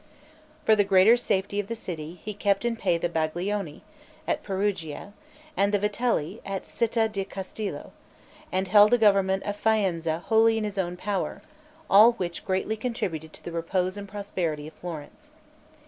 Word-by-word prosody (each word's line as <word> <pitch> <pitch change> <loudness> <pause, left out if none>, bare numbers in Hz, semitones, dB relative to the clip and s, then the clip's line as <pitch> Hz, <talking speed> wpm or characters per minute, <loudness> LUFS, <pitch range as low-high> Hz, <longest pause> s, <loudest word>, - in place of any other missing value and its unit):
For 220 - +6
the 205 - +4
greater 195 +3 +6
safety 200 -4 -1
of 205 - -2
the 230 - -3
city, 170 -5 -6
he 210 - -4
kept 200 +1 0
in 235 -1 +1
pay 185 -6 +1
the 170 - -1
Baglioni, 170 +1 -2 0.4
at - - 0
Perugia, 195 -3 -3 0.4
and 200 -4 +2
the 205 - +3
Vitelli, 210 -3 -1
at 195 -1 -4
Citta 230 -1 0
di 200 -3 -3
Castello, 195 +2 -6 0.6
and 190 +1 0
held 205 +2 +7
the 245 - +4
government 195 -3 +3
of 205 - -3
Faenza 180 -7 +1
wholly 225 0 +4
in 220 - -1
his 205 -1 -3
own 180 -1 -2
power; 195 +1 -3 0.4
all 215 +4 +7
which 175 -6 -4
greatly 190 +3 0
contributed 180 -9 -3
to - - -13
the 170 - -6
repose 180 +3 -1
and 200 0 -7
prosperity 180 -7 -3
of 155 - -10
Florence. 160 -5 -9
195 Hz, 165 wpm, -26 LUFS, 175-210 Hz, 0.6 s, held